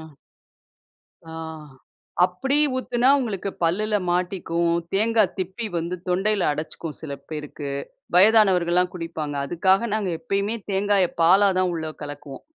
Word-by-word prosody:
ஆ. - - -9 1.3
ஆ - - -9 0.9
அப்பிடி 265 +11 0 0.2
ஊத்துனா, 250 0 +1
உங்களுக்கு 200 -5 -3
பல்லுல 210 +5 +1
மாட்டிக்கும். 175 -2 0 0.2
தேங்காய் 220 0 +2
திப்பி 190 +5 -3
வந்து 170 +2 -3
தொண்டையில 195 +2 +1
அடச்சிக்கும் 155 +1 -5
சில 155 -3 -6 0.2
பேருக்கு. 150 -2 -5 0.4
வயதானவர்கள்லாம் 180 -3 +4
குடிப்பாங்க. 165 -4 -5
அதுக்காக 190 +7 +2
நாங்க 205 -4 -1
எப்பயுமே 200 0 -1
தேங்காய 195 -1 +2 0.2
பாலா 195 +4 +6
தான் 185 -1 +2
உள்ள 160 -1 -4
கலக்குவோம். 145 -1 -9
185 Hz, 115 wpm, -23 LUFS, 165-205 Hz, 1.3 s, பாலா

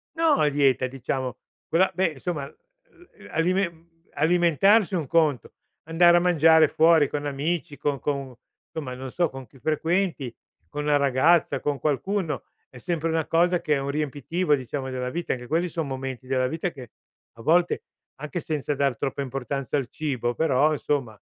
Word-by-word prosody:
No 325 -3 +3
a 150 - +4
dieta, 135 -2 +2
diciamo. 130 0 -4 0.3
Quella 185 +3 +3
beh 170 -4 0
insomma, 155 -2 -3
uhm, - - -21
uhm, 205 - -13
alimen 170 0 -1 0.3
alimentarsi 175 - +3
è - - +2
un 150 -5 -3
conto, 155 -6 +1 0.3
andare 175 +1 +5
a - - +5
mangiare 160 -3 +5
fuori 160 -2 +4
con 145 0 -3
amici, 145 +2 -2
con 145 -3 -1
con 140 -3 -3 0.3
insomma 145 -6 -5
non 130 +1 -7
so, 175 -2 +1
con 135 -2 -10
chi 135 - -20
frequenti, 160 -2 -1 0.4
con 150 0 -4
la 150 -1 +3
ragazza, 140 +5 +3
con 145 -2 -2
qualcuno, 165 +4 -1 0.3
è 125 - -14
sempre 165 +4 -2
una 160 -1 0
cosa 175 +1 +2
che 150 - 0
è 140 - +1
un 135 +1 -3
riempitivo 150 +3 -1
diciamo 130 0 -2
della 125 0 -3
vita. 170 +5 -2
Anche 125 -1 -7
quelli 170 +5 +1
son 160 -3 -3
momenti 130 -1 -5
della 130 -1 +1
vita 165 +6 -2
che 130 -8 -12 0.5
a - - -11
volte, 170 +7 +2 0.4
anche 150 +5 -4
senza 150 -2 -2
dar 140 -3 +1
troppa 140 +2 -3
importanza 135 +1 -3
al 130 -4 -2
cibo, 125 -6 -2
però, 155 -1 +3
insomma. 135 -7 -2
150 Hz, 175 wpm, -25 LUFS, 135-170 Hz, 0.5 s, andare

